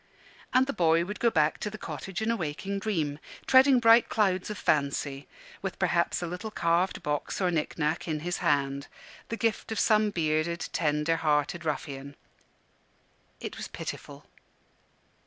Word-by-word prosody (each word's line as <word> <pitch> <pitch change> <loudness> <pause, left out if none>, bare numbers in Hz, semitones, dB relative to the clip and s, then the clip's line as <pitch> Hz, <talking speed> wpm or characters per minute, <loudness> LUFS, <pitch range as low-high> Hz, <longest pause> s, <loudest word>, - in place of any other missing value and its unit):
And 255 +1 +4
the 280 - -3
child 165 -3 +3
would 205 +3 -6
go 235 - +4
back 155 -6 +2
to 210 - -3
the 215 - -8
cottage 180 +5 -5
in 225 - +1
a - - +1
waking 190 +3 -3
dream, 160 -9 -1 0.3
treading 260 0 +6
bright 230 0 +6
clouds 190 -3 +1
of 210 - -4
fancy, 140 -3 0 0.3
with - - -4
perhaps - - +1
a - - -1
little 180 +6 -5
carved 175 -1 0
box 150 -1 -2
or 185 -2 +2
knick 155 -3 -2
knack 155 +2 -1
in 155 -2 -2
his 175 +2 -2
hand, 140 -4 0 0.4
the 230 - -3
gift 225 -1 -1
of 220 - -1
some 215 -1 +4
bearded, 165 -1 -1
tender 150 +1 +1
hearted 155 +2 0
ruffian. 140 -2 -4 1.2
It - - -6
was - - -5
pitiful. - - -7
170 Hz, 160 wpm, -28 LUFS, 150-210 Hz, 1.2 s, treading